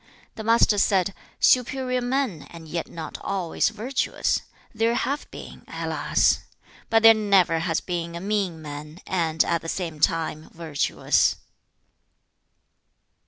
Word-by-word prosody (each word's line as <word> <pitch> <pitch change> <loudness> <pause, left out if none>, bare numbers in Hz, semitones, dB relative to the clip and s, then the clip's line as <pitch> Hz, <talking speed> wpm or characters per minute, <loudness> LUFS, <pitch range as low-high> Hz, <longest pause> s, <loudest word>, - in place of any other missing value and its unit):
The 220 - -7
Master 225 -2 +4
said, 195 -1 +2 0.3
'Superior 255 0 +2
men, 245 - -2
and 165 -1 -11
yet 170 +1 -3
not 165 -1 -7
always 185 -4 0
virtuous, 230 +5 -1 0.3
there 230 +1 +1
have 280 +4 -2
been, - - -11
alas! - - +1 0.5
But 225 0 +3
there 225 0 +10
never 195 -6 +3
has 165 -1 -1
been 170 -2 -4
a - - -4
mean 190 -4 -2
man, 150 +3 -8
and, 165 -3 +1
at 170 -1 0
the 165 - -6
same 165 -4 -4
time, 160 0 0
virtuous.' 160 -4 +1
180 Hz, 125 wpm, -24 LUFS, 165-225 Hz, 0.5 s, there